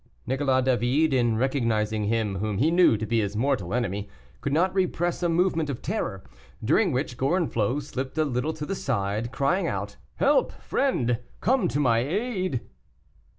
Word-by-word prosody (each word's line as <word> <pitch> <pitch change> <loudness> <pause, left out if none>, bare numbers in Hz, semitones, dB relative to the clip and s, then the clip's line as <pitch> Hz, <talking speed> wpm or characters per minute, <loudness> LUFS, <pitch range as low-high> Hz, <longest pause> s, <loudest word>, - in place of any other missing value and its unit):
Nicolas 130 -1 +1
David, 130 +4 +2
in 120 -3 +2
recognizing 110 -5 0
him 105 -2 0
whom 105 -1 -2
he 150 +9 +3
knew 175 -9 +5
to 110 - -3
be 115 +1 +1
his 100 0 -3
mortal 115 -6 0
enemy, 105 -4 -2 0.3
could 140 - -2
not 180 +5 +2
repress 175 -2 0
a 175 - +1
movement 165 -2 +1
of 135 - -5
terror, 140 - -3 0.4
during 175 - +3
which 125 -2 -2
Gorenflot 140 - 0
slipped 135 +1 -5
a 155 - +3
little 130 +2 -1
to 150 -1 -5
the 195 - -3
side, 110 - -2
crying 145 +9 +1
out, - - -4 0.2
"Help, - - +2
friend! 125 - 0 0.2
come 260 +3 +2
to 145 - -1
my 120 -5 +3
aid!" 185 - -1
130 Hz, 165 wpm, -26 LUFS, 115-165 Hz, 0.4 s, knew